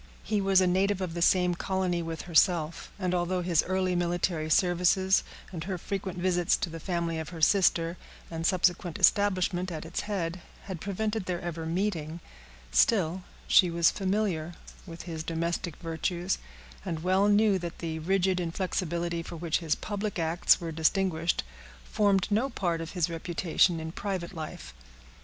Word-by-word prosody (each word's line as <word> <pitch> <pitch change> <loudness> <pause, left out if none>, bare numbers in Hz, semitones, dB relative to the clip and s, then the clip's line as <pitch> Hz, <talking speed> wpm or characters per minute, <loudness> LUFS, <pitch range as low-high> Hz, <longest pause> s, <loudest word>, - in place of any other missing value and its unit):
He 210 -2 0
was 195 -1 +4
a - - +4
native 190 +2 +2
of 185 -3 -3
the 170 - -4
same 180 0 +4
colony 180 -1 -1
with 165 -1 -5
herself; 170 -2 +2
and 185 -3 -1
although 180 +1 0
his 170 -3 +3
early 185 -1 0
military 175 -2 0
services, 180 +2 +3 0.3
and 165 -3 -5
her 190 -1 -3
frequent 190 0 -4
visits 175 -1 +2
to 170 - -3
the 165 - -7
family 170 -1 -2
of 160 - -5
her 170 -2 -8
sister, 170 -1 +3 0.3
and 165 0 -4
subsequent 175 -1 +1
establishment 185 -2 +2
at 160 -1 -5
its 165 - -4
head, 180 -3 -2 0.2
had 185 -4 -7
prevented 210 +1 -2
their 180 -2 -1
ever 165 -2 -5
meeting, 170 -3 -2 0.5
still 175 - +3 0.3
she 180 - +6
was 170 -1 +3
familiar 185 -4 -1 0.3
with 165 -1 -8
his 165 -3 -5
domestic 170 0 -2
virtues, 175 +2 -2 0.4
and 160 -1 -4
well 190 +2 +3
knew 205 -1 +4
that 170 -1 -6
the 160 -1 -4
rigid 185 +2 +1
inflexibility 170 -1 -2
for 165 - -8
which 165 -1 -1
his 165 -3 0
public 205 -1 -4
acts 165 +1 +3
were 165 -1 -5
distinguished 165 +1 +1 0.4
formed 200 - +2
no 225 +7 +2
part 175 -8 -1
of 165 - -7
his 175 -3 +1
reputation 170 0 +1
in 160 0 -5
private 190 -1 -4
life. 150 - -7
175 Hz, 160 wpm, -28 LUFS, 165-190 Hz, 0.5 s, she